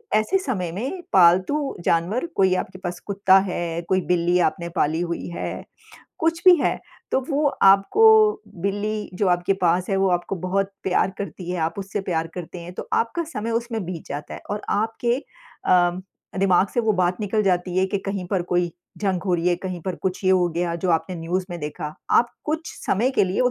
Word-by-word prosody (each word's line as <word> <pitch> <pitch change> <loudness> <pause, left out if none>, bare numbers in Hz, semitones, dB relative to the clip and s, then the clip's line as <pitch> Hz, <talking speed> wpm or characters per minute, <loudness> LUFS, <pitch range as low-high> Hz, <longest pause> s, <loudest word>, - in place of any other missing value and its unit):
ऐसे 215 - +2
समय 195 - -2
में 265 - -4
पालतू 185 - +4
जानवर 180 - +1
कोई 190 -1 +3
आपके 185 0 -4
पास 175 -1 -5
कुत्ता 195 -1 +4
है, 170 -1 -3
कोई 190 0 +3
बिल्ली 175 0 +2
आपने 170 +1 -4
पाली 160 +1 +1
हुई 170 -1 -3
है, 170 - -5 0.6
कुछ 330 +1 0
भी 365 - +10
है - - +1 0.3
तो 265 - +3
वो 290 +2 +1 0.2
आपको 195 - +5 0.6
बिल्ली 205 +1 -2
जो 190 0 +1
आपके 175 +2 +2
पास 175 +1 +2
है, 195 - +2
वो 190 0 +2
आपको 175 +2 -1
बहुत 195 +3 -1
प्यार 190 0 +2
करती 180 -2 -6
है, 180 - -2
आप 160 +4 -1
उससे 195 +1 -3
प्यार 165 -3 -1
करते 175 0 -7
हैं। 175 +1 -8
तो - - -7
आपका 235 +9 0
समय 230 -8 -4
उसमें 230 -3 -2
बीत 175 -3 -6
जाता 145 +1 -6
है - - -8
और 205 0 -3
आपके 225 +3 0 0.5
अ, 175 -1 +5 0.5
दिमाग 195 0 +3
से 240 - +3
वो 220 -2 +2
बात 180 +3 0
निकल 215 +1 0
जाती 180 -1 0
है 190 - +3
कि 200 +1 -1
कहीं 195 -2 -3
पर 185 -2 +1
कोई 175 -1 +2 0.3
जंग 190 -4 -1
हो 180 - +2
रही 170 +1 +1
है, 175 - +2
कहीं 180 -1 -5
पर 185 -2 -3
कुछ 185 +1 -3
ये 185 - +4
हो 180 -2 +4
गया 170 -1 0
जो 180 +1 -1
आपने 170 +2 0
न्यूज़ 180 +3 -2
में 175 - -5
देखा। 150 +1 -5 0.2
आप 240 - +4 0.2
कुछ 315 +2 -3
समय 235 +7 +2
के - - +6
लिए 185 +5 -1
वो 250 - +3
185 Hz, 205 wpm, -23 LUFS, 175-210 Hz, 0.6 s, भी